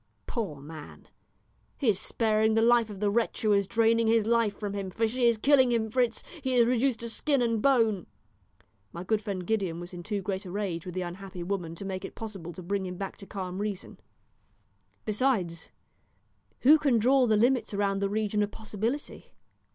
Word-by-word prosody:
Poor 205 -11 -3
man, 150 +2 -11 0.7
he 275 - -2
is 195 -3 +2
sparing 220 -1 +1
the 225 - +4
life 235 -1 +4
of 200 -2 -8
the 205 0 +1
wretch 230 +1 0
who 215 - +3
is 200 -1 +2
draining 230 +1 +3
his 225 -1 +3
life 230 -3 +2
from 205 -2 -4
him, 200 -2 -4
for 225 +4 0
she 240 +2 +1
is 235 -1 +3
killing 260 +1 +4
him, 220 -2 0
Fritz; 245 -1 0 0.2
he 260 -2 -1
is 240 -1 +6
reduced 250 0 +1
to 235 - -4
skin 280 +4 0
and 230 -3 +1
bone." 225 -8 +2 0.8
My 170 - -7
good 215 +3 0
friend 195 -4 -4
Gideon 190 -5 -1
was 175 +1 -8
in 175 - -7
too 200 +2 -3
great 190 0 -3
a 185 - -9
rage 185 -3 -3
with 180 - -6
the 185 - -1
unhappy 180 0 -7
woman 175 -3 -3
to 195 - -7
make 190 -1 -4
it 195 - -8
possible 195 -7 -7
to 180 - -9
bring 195 +1 -2
him 180 0 -6
back 195 0 -5
to 195 - -12
calm 185 -2 -5
reason. 205 -2 -5 1.1
Besides, 210 -7 0 0.9
who 300 +5 +7
can 275 -6 +3
draw 255 +3 +4
the 215 -1 +3
limits 240 0 +2
around 200 -1 0
the 200 0 0
region 210 0 0
of 205 - 0
possibility? 220 +6 -5
210 Hz, 200 wpm, -28 LUFS, 190-230 Hz, 1.1 s, who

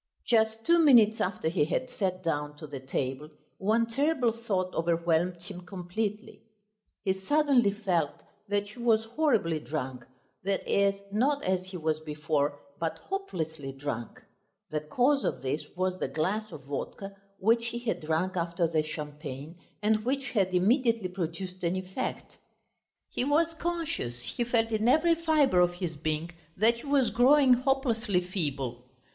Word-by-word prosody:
Just 220 -1 +2
two 340 0 +5
minutes 235 -8 +6
after 185 -3 -1
he 160 -2 +2
had 160 +11 -1
sat 190 -7 -2
down 150 -3 -2
to 155 - -8
the 145 -2 -7
table 135 +2 -3 0.3
one 220 +4 +2
terrible 265 +1 +1
thought 200 -5 -2
overwhelmed 170 +1 +1
him 180 -2 -8
completely. 200 +5 -4 0.6
He 190 - +3
suddenly 255 +3 +3
felt 185 -7 0 0.4
that 205 0 0
he 215 - -13
was 225 -2 +3
horribly 225 - +1
drunk, 130 -5 -4 0.4
that 195 0 -1
is, 200 0 +3 0.2
not 275 +7 +1
as 185 0 0
he 185 -1 -6
was 155 -1 0
before, 150 -2 -1 0.2
but 165 -1 -2
hopelessly 160 - -4
drunk. 135 -4 -5 0.5
The 155 - 0
cause 250 - +2
of 130 - -2
this 140 +3 -1
was 185 0 -1
the - - -1
glass 210 +7 -1
of 145 - -9
vodka 195 +8 -5 0.2
which 230 +4 +2
he 235 - -3
had 240 -1 -2
drunk 160 +4 0
after 170 0 0
the 160 -1 +1
champagne, 150 0 -6 0.3
and 215 0 +2
which 270 +2 -1
had 195 -5 +2
immediately 225 +2 +2
produced 180 +1 -5
an 170 +1 +1
effect. 190 +6 -4 0.7
He - - -1
was 315 +4 +2
conscious, 325 - -2
he 240 - -2
felt 230 -1 +1
in 220 +1 +1
every 320 +6 +5
fibre 315 - +3
of 175 0 +4
his 175 -3 -4
being 155 +2 -2 0.3
that 225 +4 +4
he 285 - -10
was 275 -5 +3
growing 255 +3 +6
hopelessly 240 -6 +1
feeble. 140 -9 -3
190 Hz, 155 wpm, -29 LUFS, 160-235 Hz, 0.7 s, minutes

